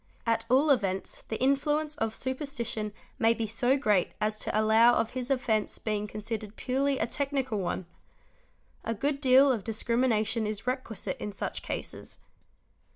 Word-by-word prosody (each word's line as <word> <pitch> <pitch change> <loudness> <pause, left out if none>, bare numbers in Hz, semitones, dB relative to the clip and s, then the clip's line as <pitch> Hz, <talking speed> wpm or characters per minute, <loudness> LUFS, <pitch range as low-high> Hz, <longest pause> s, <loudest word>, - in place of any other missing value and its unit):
At 230 -1 +1
all 275 +4 +5
events 195 -7 0
the 220 - -4
influence 295 +3 +1
of 225 -3 -1
super 260 +3 -3
_ - - -2
stition 230 -6 -3 0.3
may 225 +1 +4
be 230 - -2
so 245 +5 +1
great 210 -9 +2
as 215 0 -1
to 215 - 0
allow 225 +2 +5
of 225 - 0
his 255 0 -4
offence 230 -5 +1
being 210 -1 -2
considered 215 0 -5
purely 270 +2 0
a 220 - +1
technical 270 -3 -1
one. 185 0 -2 1.0
A 230 - -2
good 280 +5 -1
deal 265 +1 +6
of 225 -6 -1
discrimination 225 0 +1
is 215 +1 -4
requisite 255 -4 -3
in 210 - -4
such - - -4
cases. - - -6
230 Hz, 160 wpm, -29 LUFS, 215-265 Hz, 1.0 s, deal